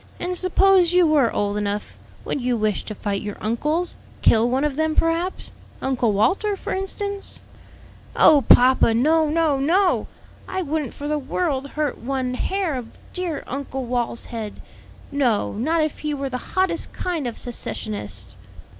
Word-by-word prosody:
And 360 Hz, +1 st, -2 dB
suppose 370 Hz, -1 st, +4 dB
you 360 Hz, -1 st, +5 dB
were 295 Hz, -7 st, +3 dB
old 205 Hz, 0 st, -1 dB
enough, 205 Hz, 0 st, -3 dB, 0.3 s
would 280 Hz, -, -2 dB
you 245 Hz, -1 st, 0 dB
wish 215 Hz, -2 st, 0 dB
to 215 Hz, -, -6 dB
fight 200 Hz, -1 st, -2 dB
your 205 Hz, -1 st, -5 dB
uncles? 300 Hz, +11 st, -1 dB, 0.3 s
kill 230 Hz, +1 st, +5 dB
one 260 Hz, +3 st, +1 dB
of 295 Hz, -2 st, 0 dB
them, 315 Hz, +1 st, 0 dB
perhaps? 335 Hz, +3 st, 0 dB, 0.3 s
Uncle 250 Hz, -4 st, +1 dB
Walter, 390 Hz, -, +1 dB
for -, -, -4 dB
instance?" 395 Hz, +1 st, -4 dB, 0.8 s
"Oh 290 Hz, -3 st, +6 dB
papa, 250 Hz, -2 st, +6 dB
no, 310 Hz, +5 st, +3 dB
no, 310 Hz, -3 st, +2 dB
no! 360 Hz, +7 st, +2 dB, 0.4 s
I 375 Hz, 0 st, -2 dB
wouldn't 300 Hz, -4 st, -2 dB
for 290 Hz, -, -5 dB
the 300 Hz, 0 st, 0 dB
world 280 Hz, -1 st, -1 dB
hurt 300 Hz, -3 st, -1 dB
one 255 Hz, 0 st, -2 dB
hair 375 Hz, +4 st, -1 dB
of 245 Hz, -3 st, -6 dB, 0.2 s
dear 355 Hz, -5 st, -3 dB
Uncle 270 Hz, -1 st, -4 dB
Wal's 240 Hz, -1 st, -1 dB
head; 220 Hz, -3 st, -6 dB, 0.5 s
no, 250 Hz, -7 st, +1 dB
not 310 Hz, +9 st, +1 dB
if 310 Hz, -, -3 dB
he 300 Hz, -1 st, -2 dB
were 275 Hz, -1 st, -3 dB
the 250 Hz, -, -6 dB
hottest 370 Hz, -3 st, +1 dB
kind 335 Hz, -7 st, -2 dB
of 235 Hz, -, -5 dB
secessionist." 105 Hz, -, -6 dB
280 Hz, 160 wpm, -22 LUFS, 235-335 Hz, 0.8 s, Oh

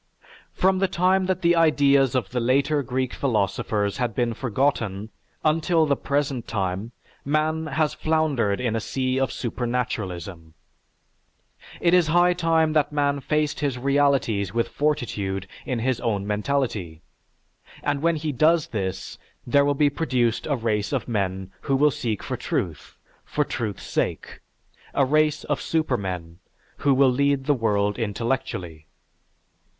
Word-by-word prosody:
From 190 Hz, 0 st, +2 dB
the 195 Hz, -, +2 dB
time 185 Hz, +1 st, +2 dB
that 185 Hz, -1 st, -1 dB
the 170 Hz, 0 st, +4 dB
ideas 140 Hz, -5 st, +4 dB
of 130 Hz, -, -1 dB
the 125 Hz, -, -1 dB
later 140 Hz, +5 st, +2 dB
Greek 130 Hz, 0 st, -2 dB
philosophers 105 Hz, -4 st, 0 dB
had 120 Hz, -3 st, -2 dB
been 120 Hz, -2 st, 0 dB
forgotten 110 Hz, -4 st, -1 dB, 0.3 s
until 160 Hz, +1 st, +3 dB
the 145 Hz, -2 st, +2 dB
present 140 Hz, -3 st, -2 dB
time, 95 Hz, +2 st, -2 dB, 0.3 s
man 155 Hz, +2 st, 0 dB
has 155 Hz, 0 st, 0 dB
floundered 155 Hz, -11 st, 0 dB
in 120 Hz, -3 st, -1 dB
a -, -, +1 dB
sea 130 Hz, +3 st, -1 dB
of 135 Hz, -, 0 dB
supernaturalism. 100 Hz, -9 st, -4 dB, 1.2 s
It 170 Hz, 0 st, +2 dB
is 180 Hz, -3 st, +5 dB
high 175 Hz, +2 st, +4 dB
time 165 Hz, -2 st, +2 dB
that 150 Hz, -1 st, +2 dB
man 145 Hz, -1 st, +1 dB
faced 150 Hz, +1 st, -1 dB
his 140 Hz, -4 st, -1 dB
realities 135 Hz, -7 st, +1 dB
with 115 Hz, -, +1 dB
fortitude 105 Hz, -10 st, -1 dB, 0.2 s
in 130 Hz, -, -1 dB
his 120 Hz, +1 st, -1 dB
own 105 Hz, -5 st, -1 dB
mentality, 105 Hz, -, -2 dB, 0.8 s
and 145 Hz, -1 st, 0 dB
when 170 Hz, +1 st, +2 dB
he 155 Hz, 0 st, -2 dB
does 155 Hz, +4 st, +3 dB
this, 95 Hz, -3 st, -4 dB, 0.3 s
there 140 Hz, +4 st, +4 dB
will 145 Hz, 0 st, +1 dB
be 145 Hz, -1 st, +3 dB
produced 125 Hz, -7 st, 0 dB
a 145 Hz, -, +1 dB
race 110 Hz, -4 st, -1 dB
of 130 Hz, -7 st, -2 dB
men 95 Hz, -4 st, -2 dB
who 135 Hz, -, 0 dB
will 145 Hz, +2 st, +4 dB
seek 120 Hz, -7 st, -3 dB
for -, -, -3 dB
truth, -, -, -4 dB, 0.3 s
for 150 Hz, -, 0 dB
truth's 110 Hz, -8 st, -4 dB
sake, -, -, -3 dB, 0.6 s
a 140 Hz, -, +4 dB
race 155 Hz, +2 st, +2 dB
of -, -, -2 dB
supermen 95 Hz, -, -2 dB, 0.4 s
who 145 Hz, -, +2 dB
will 135 Hz, -1 st, +5 dB
lead 140 Hz, +1 st, +1 dB
the 145 Hz, -, +3 dB
world 105 Hz, -4 st, 0 dB
intellectually. 105 Hz, -8 st, -3 dB
130 Hz, 145 wpm, -24 LUFS, 110-150 Hz, 1.2 s, is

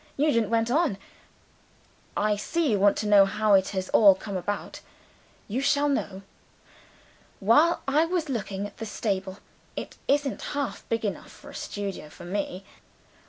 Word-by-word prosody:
Nugent 255 Hz, -7 st, +2 dB
went 230 Hz, +1 st, +1 dB
on. 300 Hz, -, +2 dB, 1.2 s
"I 210 Hz, 0 st, +2 dB
see 305 Hz, +7 st, -1 dB
you 205 Hz, -, +2 dB
want 200 Hz, +1 st, +4 dB
to 215 Hz, -, -2 dB
know 205 Hz, -1 st, +7 dB
how 210 Hz, +1 st, +1 dB
it 190 Hz, -1 st, +5 dB
has 190 Hz, -2 st, -3 dB
all 200 Hz, -3 st, +7 dB
come 200 Hz, +1 st, -7 dB
about. 195 Hz, +3 st, -4 dB, 0.7 s
You 235 Hz, +6 st, -2 dB
shall 285 Hz, +1 st, +2 dB
know. 200 Hz, -9 st, -2 dB, 1.2 s
While 295 Hz, -, +4 dB
I 300 Hz, +4 st, +3 dB
was 335 Hz, -2 st, -1 dB
looking 205 Hz, -6 st, -3 dB
at 205 Hz, -, -10 dB
the 225 Hz, -, -5 dB
stable 195 Hz, -3 st, -3 dB, 0.4 s
(it -, -, -7 dB
isn't 285 Hz, 0 st, +1 dB, 0.2 s
half 280 Hz, -3 st, -4 dB
big 230 Hz, -1 st, -1 dB
enough 205 Hz, -, -4 dB
for -, -, -13 dB
a -, -, -15 dB
studio 200 Hz, -6 st, -5 dB
for 175 Hz, -, -12 dB
Me!) 190 Hz, 0 st, -4 dB
210 Hz, 160 wpm, -26 LUFS, 195-275 Hz, 1.2 s, know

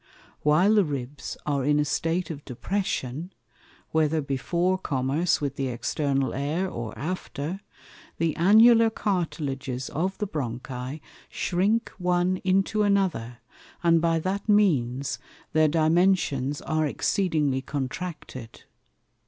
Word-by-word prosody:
While 175 Hz, +8 st, +4 dB
the 210 Hz, -2 st, +5 dB
Ribs 140 Hz, -3 st, -5 dB
are 140 Hz, -3 st, 0 dB
in 145 Hz, +2 st, +3 dB
a 150 Hz, -, +2 dB
State 165 Hz, +4 st, -1 dB
of 145 Hz, -2 st, -8 dB
Depression 160 Hz, -, -3 dB, 0.6 s
(whether 160 Hz, 0 st, +2 dB
before 170 Hz, +7 st, 0 dB
Commerce 145 Hz, +2 st, 0 dB
with 140 Hz, -2 st, -3 dB
the 135 Hz, -, -1 dB
External 135 Hz, +3 st, -1 dB
Air 150 Hz, +8 st, -1 dB
or 120 Hz, -, -6 dB
after) 175 Hz, +1 st, -4 dB, 0.6 s
the 165 Hz, -1 st, 0 dB
Annular 225 Hz, +5 st, +6 dB
Cartilages 140 Hz, -, -2 dB
of 185 Hz, +5 st, -1 dB
the 210 Hz, -, -1 dB
Bronchi 130 Hz, -, -5 dB, 0.3 s
shrink 205 Hz, +6 st, 0 dB
one 180 Hz, +1 st, +1 dB
into 195 Hz, +3 st, +1 dB
another, 185 Hz, -, 0 dB, 0.4 s
and 165 Hz, -1 st, +4 dB
by 165 Hz, 0 st, +2 dB
that 195 Hz, +6 st, -3 dB
means 140 Hz, -, +2 dB, 0.3 s
their 155 Hz, 0 st, +5 dB
Dimensions 155 Hz, -3 st, +2 dB
are 155 Hz, -1 st, 0 dB
exceedingly 150 Hz, -6 st, 0 dB
contracted. 135 Hz, -3 st, -6 dB
155 Hz, 115 wpm, -26 LUFS, 135-185 Hz, 0.6 s, Annular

